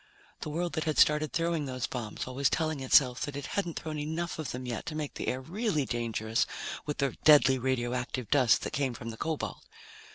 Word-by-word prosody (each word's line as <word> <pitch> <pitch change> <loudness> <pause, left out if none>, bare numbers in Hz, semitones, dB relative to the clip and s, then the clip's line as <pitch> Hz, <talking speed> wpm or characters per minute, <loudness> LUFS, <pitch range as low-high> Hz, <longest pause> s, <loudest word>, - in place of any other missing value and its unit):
The - - -5
world 170 +3 -2
that 160 - -1
had 155 -1 -1
started 150 -1 +4
throwing 165 -3 0
those 130 -1 -2
bombs, 120 -4 -5
always 130 +2 +1
telling 155 -3 0
itself 130 -1 +4
that 145 - -3
it 140 -1 -4
hadn't 175 -5 -1
thrown 155 -1 -5
enough 160 +3 -3
of 155 -5 -3
them 125 +1 -5
yet 120 -3 -4
to 155 - -4
make 150 -2 -3
the - - -5
air 130 - 0
really 175 - -1
dangerous 115 -2 -1 0.4
with 150 - -2
the 140 -2 0
deadly 140 -3 +7
radioactive 125 -1 -1
dust 130 -5 +4
that - - -4
came 135 -4 0
from 115 0 -6
the 115 - -10
cobalt. 160 +3 -3
140 Hz, 205 wpm, -30 LUFS, 125-155 Hz, 0.4 s, deadly